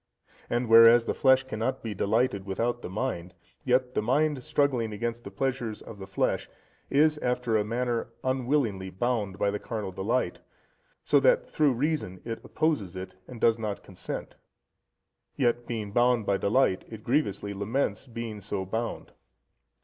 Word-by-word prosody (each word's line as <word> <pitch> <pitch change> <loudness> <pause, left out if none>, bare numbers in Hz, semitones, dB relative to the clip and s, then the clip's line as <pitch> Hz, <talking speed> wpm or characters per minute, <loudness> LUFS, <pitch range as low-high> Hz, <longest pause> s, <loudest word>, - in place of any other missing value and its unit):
And 120 +1 0
whereas 115 +1 +8
the - - 0
flesh 130 -1 +4
cannot 130 +1 -3
be 110 -2 -3
delighted 105 +1 +1
without 120 +5 -1
the - - -6
mind, 90 -4 -3 0.3
yet 125 0 +2
the - - +1
mind 140 +4 +1
struggling 140 -7 +1
against 115 +2 -3
the - - -7
pleasures 120 +1 -2
of 105 - -11
the 95 - -8
flesh, 95 - -1 0.4
is 150 +1 +3
after 125 -3 0
a 105 - +3
manner 120 +2 -1 0.2
unwillingly 130 -7 0
bound 105 -1 -1
by 100 0 +1
the 105 - -3
carnal 105 -4 -4
delight, 95 +7 -1 0.7
so - - +5
that - - +3
through 150 -4 +2
reason 125 - -1
it 115 -1 -5
opposes 145 - -1
it, 95 0 -6
and 125 -2 -9
does 115 0 +3
not 105 -2 -4
consent, 95 - -7 1.0
yet 120 -2 +1
being 110 -4 -4
bound 120 0 +3
by 100 - +2
delight, 100 -2 +2
it 110 -2 -9
grievously 105 -7 0
laments 105 +4 -2
being 115 -3 -6
so 100 -1 -4
bound. 115 +5 -4
115 Hz, 155 wpm, -28 LUFS, 100-130 Hz, 1.0 s, whereas